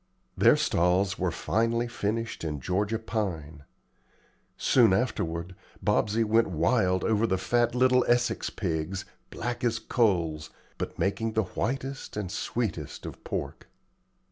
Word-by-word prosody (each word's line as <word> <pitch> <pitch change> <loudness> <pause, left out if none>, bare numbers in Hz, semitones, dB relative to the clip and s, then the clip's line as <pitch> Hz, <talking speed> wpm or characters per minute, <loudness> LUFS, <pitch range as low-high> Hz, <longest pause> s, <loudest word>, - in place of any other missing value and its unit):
Their - - +5
stalls 90 +3 +2
were 90 -1 +1
finely 115 +7 0
finished 115 -2 -3
in 75 -3 -3
Georgia 100 - 0
pine. 90 -9 -4 0.9
Soon 115 -7 +4
afterward, 90 -6 -1 0.3
Bobsey 110 +2 +2
went 115 +1 +3
wild 95 +2 +2
over 110 +1 +2
the 95 - +1
fat 120 +5 +1
little 125 0 +4
Essex 120 0 +1
pigs, 90 0 -3 0.2
black 120 +1 -4
as 115 -2 +1
coals, 85 -11 0 0.3
but - - -4
making 110 +5 0
the 110 - +2
whitest 135 0 -3
and 100 -4 -3
sweetest 100 - -3
of - - -8
pork. - - -5
105 Hz, 125 wpm, -28 LUFS, 90-115 Hz, 0.9 s, Their